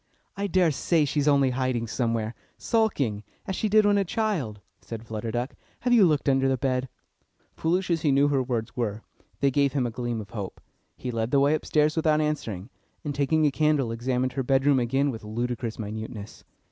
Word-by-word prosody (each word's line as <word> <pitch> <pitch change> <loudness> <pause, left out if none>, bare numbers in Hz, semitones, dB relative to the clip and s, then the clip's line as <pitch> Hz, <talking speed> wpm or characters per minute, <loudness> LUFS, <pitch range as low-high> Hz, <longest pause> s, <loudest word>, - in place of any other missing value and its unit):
"I 200 0 -2
daresay 170 -3 +2
she's 145 +1 0
only 140 -3 +4
hiding 125 -2 -1
somewhere, 115 -1 -1 0.2
sulking, 145 - 0 0.2
as 190 - -3
she 215 - -1
did 215 +1 +5
when 205 0 +4
a - - +2
child," 170 - -2 0.2
said 115 0 -8
Flutter 110 0 -4
Duck. 120 +4 -2 0.3
"Have 245 0 +2
you 215 -6 +7
looked 150 -3 +1
under 135 -1 +3
the 130 - +1
bed?" 130 +1 -1 0.6
Foolish 180 +3 0
as 165 -2 +1
he 150 - +2
knew 140 +1 +4
her 140 -2 +2
words 120 -3 -3
were, 110 -3 -2 0.4
they 140 -1 +3
gave 140 0 +2
him 135 -4 +1
a 120 - -2
gleam 120 -1 -3
of 105 - -9
hope. 100 -4 -6 0.4
He 125 - -4
led 115 -1 -1
the 140 - +3
way 140 +2 +4
upstairs 155 0 +1
without 155 -2 +3
answering, 125 -9 -2 0.3
and 145 - -2
taking 145 +3 +2
a 145 - +3
candle, 150 -4 +2
examined 125 +2 -1
her 135 - -1
bedroom 135 +1 +3
again 135 +4 +1
with 115 -3 -8
ludicrous 115 +1 -3
minuteness. 110 0 -7
135 Hz, 195 wpm, -26 LUFS, 115-150 Hz, 0.6 s, you